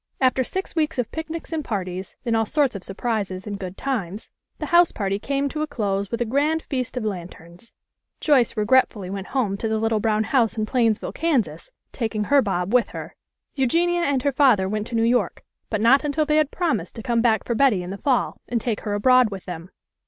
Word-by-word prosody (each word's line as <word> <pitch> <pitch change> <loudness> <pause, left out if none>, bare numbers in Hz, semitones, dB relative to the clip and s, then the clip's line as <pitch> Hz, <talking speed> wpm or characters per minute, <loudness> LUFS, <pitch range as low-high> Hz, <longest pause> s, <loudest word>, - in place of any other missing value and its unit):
After 260 0 +3
six 380 +9 -5
weeks 315 -2 0
of 245 -3 -1
picnics 320 +1 -6
and 315 -2 -1
parties, 185 -5 -4
and 230 -1 +1
all 225 -1 +1
sorts 285 -4 +1
of 195 - -6
surprises 195 -2 -3
and 205 -2 -5
good 185 0 -6
times, 215 -7 -3 0.3
the - - -4
house 345 0 +6
party 195 -1 -2
came 275 +5 -1
to 305 +2 -4
a 310 - -1
close 200 -7 -2
with 235 - -3
a - - +2
grand 295 +7 +1
feast 255 -2 -3
of 235 - -2
lanterns. 175 0 -7 0.4
Joyce 260 -7 +3
regret 255 +5 +4
fully 190 -4 -8
went 195 -1 -5
home 220 -8 -1
to 225 - -2
the 220 0 0
little 225 0 +1
brown 215 0 +1
house 230 -1 +1
in 215 - 0
Plains 230 -2 +2
ville, - - -6
Kansas, 245 - -1 0.2
taking 220 -3 -2
her 280 +6 +4
Bob 190 -2 -1
with 250 -1 +4
her. - - -8 0.4
Eugenia 340 +7 +1
and 285 -5 +1
her 285 - +2
father 255 -9 +4
went 210 +2 -2
to 235 - -5
New 225 - +2
York, 230 -5 +1 0.3
but 215 -2 -1
not 260 +6 +5
until 300 +1 0
they 300 0 +2
had 305 -2 +3
promised 240 - -2
to 225 - -7
come 235 -2 +1
back 225 -2 +2
for 235 - -2
Betty 230 -7 +3
in 180 - -6
the 195 - -5
fall, 260 -4 0
and 240 - 0
take 225 -1 -2
her 205 -2 -2
abroad 255 +3 +5
with 195 -2 -8
them. 175 0 -7
230 Hz, 225 wpm, -23 LUFS, 200-275 Hz, 0.4 s, house